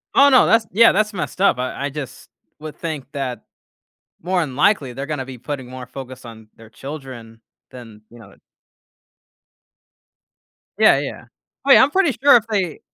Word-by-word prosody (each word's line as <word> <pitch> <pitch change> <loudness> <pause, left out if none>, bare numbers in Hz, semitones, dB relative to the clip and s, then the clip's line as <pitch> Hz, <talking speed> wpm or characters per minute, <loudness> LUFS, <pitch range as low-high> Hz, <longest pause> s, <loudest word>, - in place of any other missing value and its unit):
Oh, 280 0 +6
no, 260 -2 +5
that's, 225 0 +3
yeah, 230 +5 +6
that's 210 +1 0
messed 185 - -5
up. 200 - +3
I 130 +2 -4
I - - -2
just 140 -3 -9 0.3
would 155 0 -9
think 155 -5 -6
that 135 -4 -5 0.8
more 180 +1 0
than 140 -6 -5
likely 145 -5 +1
they're 135 +3 -6
gonna 145 -3 -4
be 130 -1 -10
putting 130 +1 -6
more 130 0 -9
focus 130 0 -10
on 110 -2 -12
their 115 -1 -16
children 130 -5 -10 0.3
than, 115 -4 -13
you 120 - -16
know 105 -4 -15
I - - -20 2.4
Yeah, - - +5
yeah, 140 -3 -7 0.4
oh, 275 - +3
yeah, - - +8
I'm 275 - +1
pretty 370 -3 +2
sure 285 -2 +7
if 230 - -3
they 190 -8 -2
140 Hz, 175 wpm, -20 LUFS, 125-190 Hz, 2.4 s, yeah